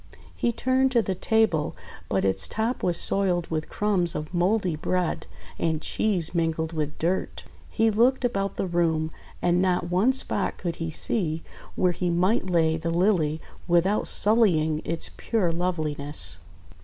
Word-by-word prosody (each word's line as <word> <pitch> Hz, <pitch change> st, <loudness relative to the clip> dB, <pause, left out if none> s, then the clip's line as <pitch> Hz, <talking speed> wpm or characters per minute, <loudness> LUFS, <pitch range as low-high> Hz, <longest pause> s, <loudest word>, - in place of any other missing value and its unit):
He 235 Hz, -, 0 dB
turned 260 Hz, +3 st, +1 dB
to 235 Hz, -2 st, +4 dB
the 190 Hz, -, -1 dB
table, 220 Hz, -6 st, +1 dB, 0.3 s
but -, -, +1 dB
its 95 Hz, -, +2 dB
top 225 Hz, +3 st, -2 dB
was 175 Hz, -2 st, 0 dB
soiled 180 Hz, -3 st, +1 dB
with 155 Hz, -1 st, -2 dB
crumbs 195 Hz, -5 st, 0 dB
of 150 Hz, +3 st, -5 dB
mouldy 180 Hz, 0 st, +1 dB
bread 180 Hz, +2 st, -2 dB, 0.3 s
and 160 Hz, -2 st, 0 dB
cheese 180 Hz, -1 st, -1 dB
mingled 160 Hz, -1 st, -1 dB
with 150 Hz, -2 st, -3 dB
dirt. 175 Hz, +4 st, -2 dB, 0.3 s
He 225 Hz, 0 st, +2 dB
looked 245 Hz, +4 st, +3 dB
about 195 Hz, -4 st, -1 dB
the -, -, -1 dB
room, 165 Hz, -3 st, 0 dB, 0.3 s
and 175 Hz, 0 st, +3 dB
not 180 Hz, -2 st, 0 dB
one 195 Hz, +8 st, +4 dB
spot 255 Hz, -6 st, -1 dB
could 170 Hz, -2 st, -4 dB
he 165 Hz, 0 st, -3 dB
see 165 Hz, -1 st, -1 dB, 0.3 s
where 180 Hz, -1 st, +2 dB
he 175 Hz, +1 st, -2 dB
might 185 Hz, +3 st, +1 dB
lay 160 Hz, -2 st, +2 dB
the 165 Hz, +1 st, -3 dB
Lily 165 Hz, -3 st, +1 dB, 0.3 s
without 175 Hz, +4 st, +2 dB
sullying 170 Hz, -9 st, +4 dB
its 165 Hz, 0 st, -3 dB
pure 205 Hz, -7 st, 0 dB
loveliness. 155 Hz, -, -2 dB
175 Hz, 155 wpm, -25 LUFS, 160-205 Hz, 0.3 s, to